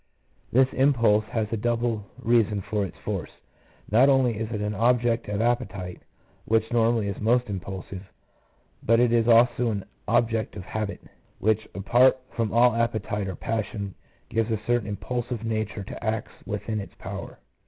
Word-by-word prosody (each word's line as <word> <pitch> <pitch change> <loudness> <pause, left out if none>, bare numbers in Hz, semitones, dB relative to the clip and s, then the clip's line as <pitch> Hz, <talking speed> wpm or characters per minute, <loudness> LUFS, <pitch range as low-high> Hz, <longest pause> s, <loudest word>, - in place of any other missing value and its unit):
This 130 +2 +5
impulse 115 -6 +3
has 110 0 -1
a - - +1
double 115 -1 0
reason 110 -3 +2
for 105 +1 -1
its 85 - -14
force: - - -3 0.6
not 125 +6 +6
only 130 -4 +3
is 110 0 -3
it 105 - -2
an 105 0 -2
object 120 +1 +2
of 105 +1 -1
appetite, 105 -7 -2 0.4
which 110 +1 +1
normally 115 -2 +2
is 100 - -4
most 120 +3 +2
impulsive, 95 0 -7 0.7
but 115 +1 +3
it 120 -1 +4
is 115 -1 +3
also 120 +1 +5
an 100 -3 -3 0.2
object 115 -3 +1
of 95 - -6
habit, 110 0 -4 0.3
which 110 +1 +1
apart 120 +7 +4
from 115 -2 -1
all 120 +1 +5
appetite 110 -3 -1
or 95 - -4
passion 105 -2 -3 0.3
gives 115 0 0
a 110 -2 0
certain 120 -3 +1
impulsive 120 +2 -3
nature 110 -2 -2
to 95 - -9
acts 110 -1 -2 0.2
within 105 +1 -3
its 100 - -8
power. - - -7
110 Hz, 160 wpm, -26 LUFS, 105-120 Hz, 0.7 s, not